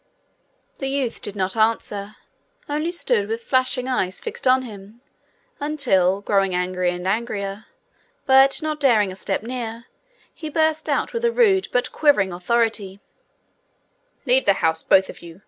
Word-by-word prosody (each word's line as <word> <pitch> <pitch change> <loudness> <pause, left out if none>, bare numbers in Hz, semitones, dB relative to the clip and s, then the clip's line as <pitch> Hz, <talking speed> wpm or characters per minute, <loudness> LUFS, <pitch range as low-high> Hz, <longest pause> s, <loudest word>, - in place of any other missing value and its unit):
The 270 - -3
youth 270 -3 -2
did 205 - -5
not 190 -1 -2
answer, 215 -2 -1 0.5
only 305 +3 -2
stood 245 - 0
with 225 +2 -4
flashing 255 0 0
eyes 190 -8 -1
fixed - - -5
on 260 0 +4
him, 210 -1 -11 0.6
until, 200 -11 +1
growing 195 -2 +1
angrier 180 0 -1
and 180 0 -7
angrier, 200 -1 -3 0.6
but 270 +3 +5
not 310 -1 -2
daring 225 -8 +3
a - - -8
step 195 +1 -3
nearer, 230 -1 -6 0.5
he 315 - -7
burst 315 0 0
out - - 0
with 465 0 -3
a 470 - +3
rude 400 -6 +3
but 245 - 0
quavering 210 - +2
authority: 205 +1 -1 1.3
'Leave 260 0 +4
the 200 - +7
house, 160 -3 0
both 190 0 +4
of - - -11
you! 170 +1 -12
225 Hz, 150 wpm, -22 LUFS, 195-270 Hz, 1.3 s, the